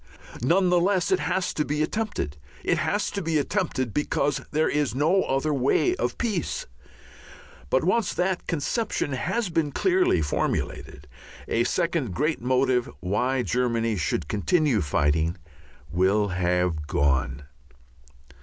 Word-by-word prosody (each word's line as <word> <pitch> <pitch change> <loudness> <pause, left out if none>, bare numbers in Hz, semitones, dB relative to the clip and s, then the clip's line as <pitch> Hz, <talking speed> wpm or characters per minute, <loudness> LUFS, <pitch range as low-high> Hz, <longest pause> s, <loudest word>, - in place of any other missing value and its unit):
None 180 +9 +3
the 180 0 +4
less 185 - +1
it 380 - +3
has 190 -1 -1
to 150 - 0
be 150 +1 -1
attempted. 205 - -2 0.3
It 175 - +1
has 170 +6 0
to 200 - -3
be 165 -2 0
attempted 145 - -1
because 145 -1 0
there 155 +1 +1
is 145 -5 0
no 160 +8 +3
other 135 +3 0
way 140 - +2
of - - -2
peace. 210 - -2 1.0
But 130 - +2
once 190 +4 +1
that 180 0 -1
conception 165 - -1
has 205 - -1
been 165 -3 0
clearly 365 - +2
formulated, 75 0 -3 0.4
a 115 +1 +1
second 165 - -1
great 155 +2 0
motive 130 0 +1
why 125 - 0
Germany 115 -2 0
should 80 -3 -1
continue 145 - +1
fighting 80 +4 +1 0.5
will 95 +4 +2
have 90 -3 0
gone. 70 -2 0
135 Hz, 135 wpm, -25 LUFS, -, 1.0 s, the